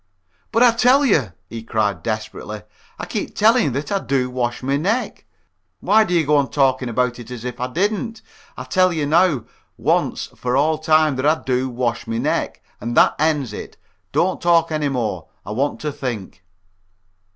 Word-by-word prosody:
"But 230 Hz, +1 st, +4 dB
I 245 Hz, -, +7 dB
tell 250 Hz, +5 st, +4 dB
you," 135 Hz, -, +2 dB
he 115 Hz, +4 st, -7 dB
cried, 105 Hz, -5 st, -1 dB
desperately, 110 Hz, 0 st, -5 dB, 0.3 s
"I -, -, -5 dB
keep 200 Hz, +4 st, -4 dB
telling 225 Hz, +1 st, +4 dB
you -, -, +1 dB
that 140 Hz, +3 st, -4 dB
I 200 Hz, -, +1 dB
do 130 Hz, -6 st, -1 dB
wash 120 Hz, -1 st, -2 dB
my 135 Hz, +2 st, +1 dB
neck. 205 Hz, -, -1 dB, 0.5 s
Why 220 Hz, +1 st, +4 dB
do 180 Hz, -, -1 dB
you 165 Hz, -2 st, +3 dB
go 150 Hz, +1 st, +3 dB
on 140 Hz, -3 st, +1 dB
talking 130 Hz, -1 st, +1 dB
about 125 Hz, +1 st, 0 dB
it 120 Hz, -1 st, -10 dB
as 125 Hz, -1 st, -7 dB
if 125 Hz, 0 st, -5 dB
I 125 Hz, -, -1 dB
didn't! 215 Hz, -, -2 dB, 0.3 s
I -, -, -5 dB
tell 185 Hz, -1 st, +2 dB
you 155 Hz, -3 st, -1 dB
now, 155 Hz, -4 st, +3 dB, 0.3 s
once -, -, 0 dB
for 125 Hz, +1 st, -1 dB
all 155 Hz, +2 st, +2 dB
time, 155 Hz, -3 st, +3 dB
that 130 Hz, -, -1 dB
I 155 Hz, +1 st, +2 dB
do 130 Hz, 0 st, 0 dB
wash 120 Hz, -1 st, -2 dB
my 115 Hz, 0 st, -2 dB
neck, -, -, -2 dB, 0.2 s
and 120 Hz, +3 st, -4 dB
that -, -, +6 dB
ends 150 Hz, -7 st, +1 dB
it. -, -, -8 dB, 0.3 s
Don't 185 Hz, +2 st, +1 dB
talk 165 Hz, -1 st, +3 dB
any 150 Hz, -2 st, 0 dB
more. 125 Hz, -5 st, -3 dB, 0.2 s
I -, -, -6 dB
want 135 Hz, +7 st, -1 dB
to 150 Hz, -, -2 dB
think." 110 Hz, -9 st, -6 dB
140 Hz, 190 wpm, -20 LUFS, 120-170 Hz, 0.5 s, I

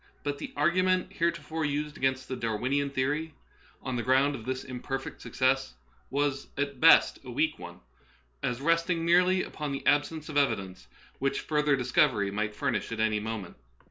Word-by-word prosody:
But 145 Hz, -1 st, -3 dB
the -, -, -6 dB
argu 170 Hz, +5 st, +3 dB
ment 185 Hz, 0 st, +1 dB
heretofore 165 Hz, -2 st, -1 dB
urged 150 Hz, +1 st, -2 dB
against 130 Hz, 0 st, -1 dB
the 130 Hz, -, -3 dB
Darwinian 130 Hz, +5 st, -1 dB
theory, 145 Hz, +4 st, -2 dB, 0.5 s
on 130 Hz, -2 st, -3 dB
the -, -, 0 dB
ground 135 Hz, +3 st, +3 dB
of 115 Hz, -5 st, -7 dB
this 130 Hz, 0 st, -3 dB
imperfect 130 Hz, +1 st, -5 dB
success, 130 Hz, -, 0 dB, 0.3 s
was 140 Hz, 0 st, -1 dB
at 140 Hz, -1 st, -2 dB
best 165 Hz, +2 st, +6 dB
a 130 Hz, -, -10 dB
weak 150 Hz, +5 st, 0 dB
one, 90 Hz, 0 st, -10 dB, 0.6 s
as 125 Hz, +1 st, -2 dB
resting 165 Hz, +2 st, +1 dB
merely 180 Hz, +2 st, +4 dB
upon 150 Hz, -2 st, -5 dB
the 135 Hz, -, -5 dB
absence 145 Hz, +3 st, +1 dB
of 150 Hz, -2 st, -3 dB
evidence 100 Hz, -9 st, 0 dB, 0.3 s
which 135 Hz, +1 st, 0 dB
further 150 Hz, -2 st, +2 dB
discovery 125 Hz, -6 st, +2 dB
might 105 Hz, +1 st, -2 dB
furnish -, -, -2 dB
at 115 Hz, -, -4 dB
any 110 Hz, -1 st, +2 dB
moment. 110 Hz, -3 st, -5 dB
140 Hz, 170 wpm, -29 LUFS, 125-150 Hz, 0.6 s, best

